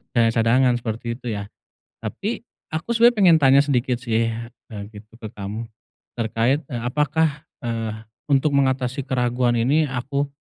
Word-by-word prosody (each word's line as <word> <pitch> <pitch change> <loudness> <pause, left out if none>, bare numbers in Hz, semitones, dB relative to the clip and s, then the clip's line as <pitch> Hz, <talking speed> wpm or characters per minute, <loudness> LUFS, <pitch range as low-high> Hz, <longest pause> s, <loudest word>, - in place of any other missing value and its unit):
punya 115 -1 +4
cadangan 120 +2 +3
seperti 115 0 -4
itu 125 - -8
ya, 100 0 -6 0.5
tapi - - -4 0.2
aku 160 +9 -2
sebenernya 235 +1 +5
pengen 180 -5 +7
tanya 135 +1 +7
sedikit 125 -3 0
sih, 115 -1 0 0.4
eee, 105 -2 -5
gitu 105 +1 -13
ke 110 - -7
kamu 105 +3 -5 0.5
terkait, 115 +5 +1
eee, 120 - -3
apakah, 150 +4 0 0.2
eee, 115 -2 -2 0.4
untuk 140 +1 +3
mengatasi 130 0 +1
keraguan 125 -2 +1
ini 145 +6 +2
aku 140 +3 -2
125 Hz, 145 wpm, -22 LUFS, 115-140 Hz, 0.5 s, pengen